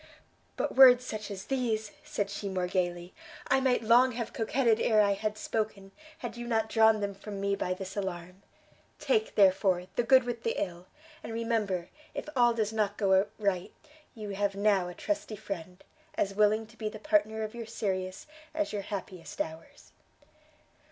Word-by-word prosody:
"But -, -, -2 dB
words 255 Hz, -2 st, +8 dB
such 215 Hz, -3 st, -5 dB
as 195 Hz, -2 st, -7 dB
these," 225 Hz, -5 st, -1 dB
said 200 Hz, -1 st, -3 dB
she 200 Hz, 0 st, -4 dB
more 185 Hz, -1 st, -1 dB
gaily, 175 Hz, -1 st, -2 dB, 0.4 s
"I -, -, +4 dB
might 255 Hz, -3 st, +2 dB
long 245 Hz, +3 st, +5 dB
have 230 Hz, -1 st, -4 dB
coquetted 230 Hz, 0 st, +2 dB
ere 220 Hz, -2 st, +3 dB
I 205 Hz, -1 st, +5 dB
had 210 Hz, +1 st, -3 dB
spoken, 210 Hz, -4 st, -3 dB, 0.3 s
had 325 Hz, -, -6 dB
you 240 Hz, 0 st, -6 dB
not 220 Hz, -2 st, 0 dB
drawn 220 Hz, -1 st, +4 dB
them 200 Hz, 0 st, -2 dB
from 200 Hz, 0 st, -8 dB
me 200 Hz, 0 st, 0 dB
by 185 Hz, -2 st, -2 dB
this 190 Hz, 0 st, -7 dB
alarm. 180 Hz, -1 st, -5 dB, 0.6 s
Take, 440 Hz, -3 st, 0 dB
therefore, 190 Hz, -2 st, +4 dB
the -, -, +4 dB
good 260 Hz, +2 st, +5 dB
with 240 Hz, -1 st, -4 dB
the 230 Hz, -, -1 dB
ill, 175 Hz, -1 st, -4 dB, 0.3 s
and -, -, -7 dB
remember, 225 Hz, -6 st, -1 dB, 0.3 s
if -, -, -5 dB
all 240 Hz, -2 st, +4 dB
does 220 Hz, -1 st, -1 dB
not 210 Hz, -2 st, 0 dB
go 195 Hz, -1 st, +3 dB
right, 195 Hz, -4 st, -1 dB, 0.4 s
you 215 Hz, -2 st, -7 dB
have 200 Hz, 0 st, -1 dB
now 200 Hz, -3 st, +2 dB
a 180 Hz, -, -8 dB
trusty 310 Hz, -7 st, -3 dB
friend, 185 Hz, -4 st, -7 dB, 0.3 s
as 195 Hz, -, 0 dB
willing 215 Hz, +2 st, +3 dB
to 220 Hz, +1 st, -19 dB
be 215 Hz, -1 st, -3 dB
the 215 Hz, -, -9 dB
partner 215 Hz, +1 st, +1 dB
of 215 Hz, -, -5 dB
your 235 Hz, -2 st, -7 dB
serious 190 Hz, -4 st, -3 dB, 0.3 s
as 310 Hz, -6 st, -1 dB
your 205 Hz, -, -2 dB
happiest 190 Hz, -3 st, -7 dB
hours." 160 Hz, +1 st, -6 dB
210 Hz, 180 wpm, -30 LUFS, 195-225 Hz, 0.6 s, words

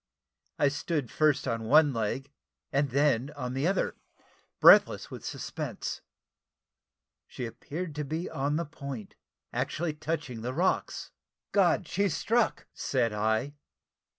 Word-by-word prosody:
I 145 Hz, -, +4 dB
stood 145 Hz, -2 st, -2 dB
first 150 Hz, -3 st, +2 dB
on 115 Hz, -2 st, -1 dB
one 145 Hz, +3 st, +6 dB
leg, 120 Hz, +5 st, -2 dB, 0.4 s
and 140 Hz, +1 st, +1 dB
then 140 Hz, -1 st, +2 dB
on 125 Hz, -3 st, -4 dB
the 135 Hz, +5 st, 0 dB
other, 195 Hz, 0 st, 0 dB, 0.6 s
breathless -, -, +7 dB
with -, -, -8 dB
suspense. -, -, -5 dB, 1.3 s
She 125 Hz, -, -5 dB
appeared 155 Hz, +8 st, -6 dB
to 150 Hz, -, -1 dB
be 160 Hz, +5 st, -3 dB
on 140 Hz, +2 st, -1 dB
the 170 Hz, +2 st, -1 dB
point 140 Hz, -8 st, -7 dB, 0.4 s
actually 160 Hz, -1 st, -1 dB
touching 150 Hz, -6 st, -4 dB
the 125 Hz, +3 st, -3 dB
rocks 185 Hz, +4 st, 0 dB, 0.4 s
"God! 180 Hz, -4 st, +3 dB
she's 200 Hz, -1 st, 0 dB
struck!" 235 Hz, 0 st, +1 dB
said 120 Hz, -5 st, 0 dB
I. 110 Hz, +6 st, 0 dB
145 Hz, 125 wpm, -29 LUFS, 125-160 Hz, 1.3 s, breathless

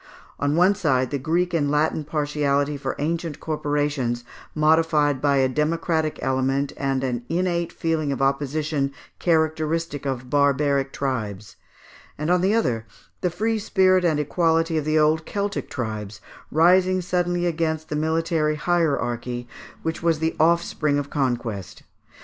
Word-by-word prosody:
On 145 Hz, +1 st, +1 dB
one 180 Hz, +4 st, +5 dB
side, 135 Hz, -10 st, +1 dB
the 140 Hz, -, -1 dB
Greek 170 Hz, +5 st, 0 dB
and 145 Hz, -4 st, +1 dB
Latin 150 Hz, +1 st, +1 dB
partiality 145 Hz, -1 st, 0 dB
for 140 Hz, -, -4 dB
ancient 160 Hz, 0 st, -2 dB
corporations, 145 Hz, -5 st, -1 dB, 0.3 s
modified 155 Hz, -3 st, +3 dB
by 140 Hz, -1 st, +3 dB
a 135 Hz, -1 st, +4 dB
democratic 155 Hz, +2 st, 0 dB
element, 135 Hz, +1 st, 0 dB
and 135 Hz, -1 st, -1 dB
an 125 Hz, -2 st, -2 dB
innate 170 Hz, -1 st, 0 dB
feeling 160 Hz, -4 st, -1 dB
of 135 Hz, -, -3 dB
opposition 140 Hz, +1 st, 0 dB, 0.3 s
characteristic 160 Hz, -2 st, 0 dB
of 130 Hz, -2 st, -3 dB
barbaric 140 Hz, 0 st, +2 dB
tribes; 110 Hz, -7 st, -4 dB, 0.6 s
and 150 Hz, +3 st, -1 dB
on 180 Hz, 0 st, +3 dB
the 195 Hz, +4 st, +2 dB
other, 115 Hz, -, 0 dB, 0.3 s
the 180 Hz, -, +1 dB
free 220 Hz, +6 st, -1 dB
spirit 185 Hz, -3 st, +3 dB
and 160 Hz, -4 st, +2 dB
equality 165 Hz, +2 st, +1 dB
of 155 Hz, -2 st, 0 dB
the 155 Hz, 0 st, +2 dB
old 155 Hz, +1 st, +3 dB
Celtic 200 Hz, +3 st, -3 dB
tribes 110 Hz, -5 st, -5 dB, 0.3 s
rising 185 Hz, +3 st, +4 dB
suddenly 175 Hz, 0 st, 0 dB
against 160 Hz, -2 st, -1 dB
the 150 Hz, -, -2 dB
military 160 Hz, 0 st, 0 dB
hierarchy, 125 Hz, -7 st, -1 dB, 0.4 s
which 160 Hz, 0 st, -3 dB
was 165 Hz, -2 st, +2 dB
the 160 Hz, +1 st, -1 dB
offspring 160 Hz, -2 st, +2 dB
of 145 Hz, 0 st, -3 dB
conquest. 120 Hz, -8 st, -2 dB
150 Hz, 140 wpm, -23 LUFS, 140-165 Hz, 0.6 s, one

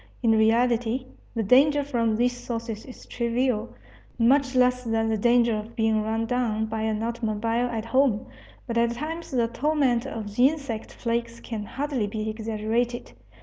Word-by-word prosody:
In 230 Hz, -, +4 dB
reality, 235 Hz, +2 st, +2 dB, 0.3 s
the 225 Hz, -, 0 dB
danger 285 Hz, +7 st, +5 dB
from 235 Hz, -6 st, 0 dB
these 245 Hz, +2 st, +1 dB
sources 230 Hz, -3 st, -5 dB
is 255 Hz, -, -12 dB
trivial, 235 Hz, -1 st, -1 dB, 0.4 s
much 260 Hz, +3 st, +3 dB
less 250 Hz, 0 st, +3 dB
than 225 Hz, -1 st, 0 dB
the 220 Hz, -, +1 dB
danger 235 Hz, +1 st, +3 dB
of 215 Hz, +2 st, -6 dB
being 220 Hz, -1 st, +2 dB
run 220 Hz, +1 st, -1 dB
down 225 Hz, -3 st, 0 dB
by 220 Hz, 0 st, -3 dB
an 220 Hz, 0 st, -1 dB
automobile 230 Hz, 0 st, -1 dB
at 225 Hz, -2 st, -4 dB
home. 255 Hz, -2 st, +2 dB, 0.4 s
But 235 Hz, -2 st, -1 dB
at 235 Hz, 0 st, +2 dB
times 320 Hz, +6 st, -5 dB
the 240 Hz, -3 st, +1 dB
torment 265 Hz, -1 st, +1 dB
of 215 Hz, -4 st, -6 dB
insect 270 Hz, -4 st, +1 dB
plagues 235 Hz, 0 st, -2 dB
can 215 Hz, -3 st, -5 dB
hardly 270 Hz, -3 st, -2 dB
be 215 Hz, +1 st, -4 dB
exaggerated. 225 Hz, +2 st, -2 dB
235 Hz, 155 wpm, -25 LUFS, 220-250 Hz, 0.4 s, danger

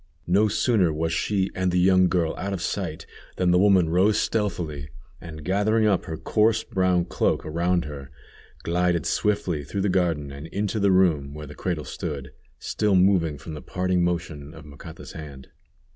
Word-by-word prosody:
No 100 Hz, +5 st, +3 dB
sooner 105 Hz, -4 st, +2 dB
was 80 Hz, +1 st, -2 dB
she 100 Hz, -2 st, 0 dB
and 95 Hz, 0 st, 0 dB
the 90 Hz, -, 0 dB
young 95 Hz, 0 st, +4 dB
girl 85 Hz, -3 st, 0 dB
out 100 Hz, +1 st, -4 dB
of 95 Hz, -, -4 dB
sight 90 Hz, -4 st, -3 dB, 0.3 s
than 90 Hz, -1 st, +2 dB
the 90 Hz, -, +4 dB
woman 95 Hz, -3 st, +4 dB
rose 95 Hz, +6 st, +3 dB
stealthily, 80 Hz, -9 st, -2 dB, 0.3 s
and 80 Hz, -2 st, -9 dB
gathering 105 Hz, +4 st, +2 dB
up 100 Hz, -4 st, +2 dB
her 80 Hz, -3 st, -5 dB
coarse 110 Hz, +4 st, +2 dB
brown 95 Hz, -5 st, +1 dB
cloak -, -, 0 dB
around 85 Hz, +2 st, 0 dB
her, 70 Hz, -2 st, -8 dB, 0.5 s
glided 90 Hz, 0 st, +1 dB
swiftly 95 Hz, -7 st, 0 dB
through 95 Hz, +8 st, -4 dB
the 100 Hz, -, +1 dB
garden 85 Hz, -6 st, 0 dB
and 70 Hz, +3 st, -8 dB
into 105 Hz, +4 st, -2 dB
the 100 Hz, -1 st, +3 dB
room 80 Hz, -7 st, +2 dB
where 75 Hz, 0 st, -7 dB
the 75 Hz, -, -10 dB
cradle 80 Hz, -3 st, -3 dB
stood, 70 Hz, -1 st, -5 dB, 0.3 s
still 105 Hz, -2 st, 0 dB
moving 90 Hz, -5 st, +3 dB
from 70 Hz, +4 st, -9 dB
the 75 Hz, -, -7 dB
parting 90 Hz, -1 st, 0 dB
motion 80 Hz, -3 st, -3 dB
of 75 Hz, -2 st, -12 dB
Macata's 75 Hz, +3 st, -11 dB
hand. 70 Hz, -5 st, -10 dB
90 Hz, 175 wpm, -24 LUFS, 80-95 Hz, 0.5 s, young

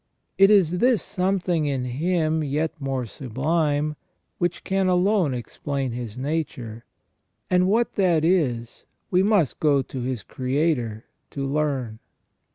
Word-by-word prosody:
"* -, -, -51 dB
It 195 Hz, 0 st, +8 dB
is 180 Hz, -4 st, +4 dB
this 245 Hz, -1 st, +4 dB
something 180 Hz, -4 st, 0 dB
in 135 Hz, -3 st, -1 dB
him 160 Hz, +4 st, 0 dB
yet 150 Hz, +3 st, -1 dB
more 135 Hz, -2 st, -2 dB
sublime 145 Hz, +5 st, -1 dB, 0.4 s
which 175 Hz, -1 st, -1 dB
can 195 Hz, -1 st, +1 dB
alone 180 Hz, -5 st, +2 dB
explain 135 Hz, +2 st, -4 dB
his 120 Hz, -1 st, -6 dB
nature, 130 Hz, -6 st, -4 dB, 0.7 s
and 180 Hz, 0 st, +4 dB
what 230 Hz, +4 st, +2 dB
that 175 Hz, -5 st, +3 dB
is 130 Hz, -10 st, 0 dB, 0.2 s
we 180 Hz, -, +4 dB
must 195 Hz, -, +2 dB
go 145 Hz, -3 st, +3 dB
to 130 Hz, -, -6 dB
his 125 Hz, -3 st, -3 dB
Creator 130 Hz, -4 st, -1 dB, 0.2 s
to 140 Hz, -1 st, -4 dB
learn. 135 Hz, -6 st, -1 dB
150 Hz, 135 wpm, -24 LUFS, 130-180 Hz, 0.7 s, It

